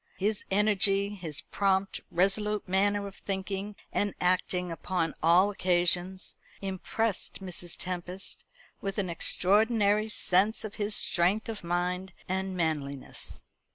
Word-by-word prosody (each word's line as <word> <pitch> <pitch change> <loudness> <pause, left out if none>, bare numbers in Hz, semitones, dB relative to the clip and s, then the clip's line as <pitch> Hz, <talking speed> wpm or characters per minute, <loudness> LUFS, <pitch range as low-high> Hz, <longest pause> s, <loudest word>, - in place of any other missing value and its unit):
His 205 +2 0
energy, 200 0 +2
his 170 -6 +1
prompt, 195 -1 0
resolute 205 +3 +1
manner 200 +2 +2
of 195 -1 -9
thinking 195 +1 -4 0.2
and 205 -1 0
acting 180 0 +1
upon 165 0 -1
all 180 +5 +5
occasions, 180 0 0 0.2
impressed 195 +2 -2
Mrs. 180 -2 -7
Tempest 180 +1 -4 0.4
with 195 -1 -3
an 190 -4 -1
extraordinary 210 +4 +3
sense 210 +2 +2
of 215 - -6
his 205 +1 +3
strength 190 +7 +3
of 220 -4 -5
mind 180 +2 -2
and 190 0 -2
manliness. 145 -5 -3
190 Hz, 120 wpm, -29 LUFS, 180-205 Hz, 0.4 s, all